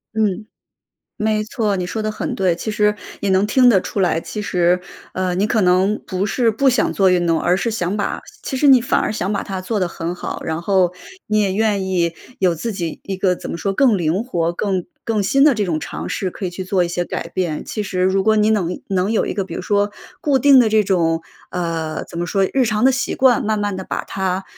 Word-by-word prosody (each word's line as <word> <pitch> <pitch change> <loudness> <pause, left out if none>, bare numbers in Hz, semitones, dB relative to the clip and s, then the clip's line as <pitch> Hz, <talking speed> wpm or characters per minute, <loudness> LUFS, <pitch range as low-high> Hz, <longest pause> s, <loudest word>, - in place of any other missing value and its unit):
嗯， 215 -1 0 0.7
没 215 -1 0
错， 215 -2 -1
你 180 -1 -2
说 220 +4 -3
得 215 - -1
很 215 - -4
对。 185 -3 +1
其 215 - -4
实 210 0 +1 0.2
也 200 - -1
能 190 +2 +3
听 250 +4 +5
得 200 -6 +5
出 200 - -4
来， 175 -3 +2
其 210 - -6
实， 180 -2 +2 0.3
呃， 185 -1 -1
你 195 +3 +1
可 220 0 +1
能 185 +3 +2
不 185 0 -2
是 230 +3 +2
不 250 +6 +2
想 245 -3 +1
做 190 -2 +3
运 175 -1 +2
动， 165 -1 +2
而 175 +1 +2
是 230 +5 -1
想 200 -3 -2
把 205 - -2 0.2
其 265 - -4
实 290 - +2
你 265 -3 +7
反 235 - +1
而 - - -1
想 200 -2 -2
把 200 - -1
它 190 -1 -5
做 210 +4 -2
得 185 - +1
很 170 0 -4
好。 180 - -6
然 160 0 -2
后 185 -1 +2 0.3
你 215 0 +2
也 200 -2 +1
愿 210 -2 +1
意 170 -3 0 0.2
有 180 -3 +2
自 220 +8 -4
己 170 -5 -4
一 195 - -4
个 185 -1 +1
怎 - - -7
么 - - -3
说 195 +4 -2
更 235 +1 +3
灵 175 +6 0
活、 170 -8 -1
更 190 +1 -1 0.2
更 220 -3 0
新 275 +8 +3
的 295 -3 +5
这 210 -2 0
种 165 -4 -1
尝 - - -6
试 190 - -2
可 195 - -7
以 - - -3
去 185 +2 -6
做 185 0 +1
一 - - -3
些 175 +1 -2
改 170 - -5
变。 170 -3 -2
其 215 - -4
实 190 -2 -3
如 190 +1 +2
果 220 +1 +4
你 210 0 +3
能 180 -5 0
能 190 +2 0
有 225 - +1
一 - - -3
个 195 0 -1
比 190 - -8
如 - - -4
说 205 0 +1 0.3
固 280 -3 +2
定 275 +1 +6
的 240 -3 +5
这 215 0 +3
种 165 -4 +1 0.3
呃， 165 -3 -3
怎 - - -11
么 175 - -1
说 195 +3 +1
日 265 -1 +3
常 215 0 0
的 265 - +6
习 265 - -1
惯 260 -3 +4
慢 215 0 0
慢 205 -2 -2
地 190 - -6
把 - - -4
它， 190 0 -2
195 Hz, 270 characters per minute, -19 LUFS, 180-215 Hz, 0.7 s, 你